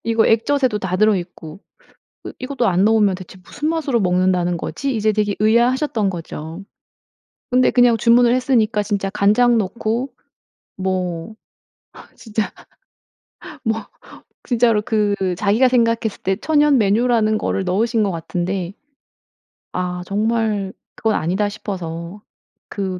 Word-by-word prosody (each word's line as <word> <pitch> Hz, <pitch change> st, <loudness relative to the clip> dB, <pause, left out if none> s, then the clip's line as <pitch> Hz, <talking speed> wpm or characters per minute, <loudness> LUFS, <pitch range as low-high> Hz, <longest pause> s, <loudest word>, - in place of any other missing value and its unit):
이거 225 Hz, 0 st, +2 dB
액젓에도 245 Hz, 0 st, +2 dB
다 185 Hz, -2 st, -2 dB
들어 215 Hz, +1 st, +4 dB
있고, 175 Hz, -1 st, -8 dB, 0.6 s
그 -, -, -8 dB
이것도 255 Hz, -2 st, -1 dB
안 185 Hz, +1 st, +2 dB
넣으면 210 Hz, -3 st, +3 dB
대체 185 Hz, 0 st, -12 dB
무슨 295 Hz, +9 st, -4 dB
맛으로 295 Hz, -7 st, 0 dB
먹는다는 180 Hz, -2 st, +1 dB
거지?' 270 Hz, +8 st, -3 dB
이제 215 Hz, 0 st, +2 dB
되게 210 Hz, -1 st, 0 dB
의아하셨던 235 Hz, 0 st, +2 dB
거죠. 165 Hz, +1 st, -7 dB, 0.9 s
근데 250 Hz, 0 st, +3 dB
그냥 245 Hz, -2 st, +4 dB
주문을 235 Hz, +2 st, +4 dB
했으니까 230 Hz, -5 st, +1 dB
진짜 200 Hz, -2 st, -2 dB
간장 215 Hz, +4 st, +3 dB
넣고 225 Hz, +5 st, -2 dB, 0.7 s
뭐 185 Hz, 0 st, -3 dB, 0.8 s
진짜 220 Hz, -2 st, -3 dB, 1.1 s
뭐 225 Hz, -1 st, 0 dB, 0.6 s
진짜로 230 Hz, -3 st, +2 dB
그 210 Hz, -2 st, 0 dB, 0.2 s
자기가 215 Hz, +5 st, +3 dB
생각했을 230 Hz, -3 st, 0 dB
때 190 Hz, -, +1 dB
천연 295 Hz, +1 st, +3 dB
메뉴라는 215 Hz, +1 st, +2 dB
거를 195 Hz, -, -1 dB
넣으신 220 Hz, +5 st, +1 dB
것 200 Hz, -, +1 dB
같은데, 180 Hz, +2 st, -3 dB, 1.0 s
아 180 Hz, 0 st, -3 dB
정말 210 Hz, -1 st, -1 dB, 0.2 s
그건 220 Hz, -1 st, 0 dB
아니다 190 Hz, +6 st, 0 dB
싶어서 180 Hz, -2 st, -6 dB, 0.5 s
그, 190 Hz, -3 st, -4 dB
215 Hz, 270 characters per minute, -19 LUFS, 190-235 Hz, 1.1 s, 들어